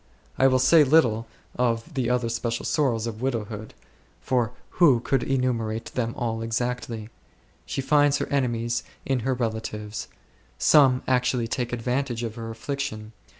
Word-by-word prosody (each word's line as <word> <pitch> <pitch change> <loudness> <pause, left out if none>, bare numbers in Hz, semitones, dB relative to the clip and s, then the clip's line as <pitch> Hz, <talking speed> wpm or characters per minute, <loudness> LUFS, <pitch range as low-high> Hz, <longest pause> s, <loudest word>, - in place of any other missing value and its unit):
I 135 - +4
will 130 -1 +4
say 140 +5 +6
little 125 -6 +3 0.3
of 120 +5 0
the 130 -4 0
other 125 -1 +1
special! 115 0 -2
sorrows 120 -7 +1
of 115 -1 -5
widowhood; 110 -4 -3 0.4
for 120 -3 0 0.3
who 145 -9 +6
could 125 +2 0
enumer 125 -5 0
ate 115 - -7
them 115 -2 -2
all 115 -2 -2
exactly? 115 -1 -3 0.6
She - - -2
finds 145 +1 +3
her - - -2
enemies, 120 -3 0 0.2
in 135 -2 +1
her 130 +2 0
relatives. 110 -3 -4 0.5
Some 130 - +5
actually 125 -2 +1
take 120 +1 -2
advantage 120 0 -2
of 115 -2 -3
her 115 -1 -7
affliction. 110 -2 -4
120 Hz, 150 wpm, -25 LUFS, 115-130 Hz, 0.6 s, say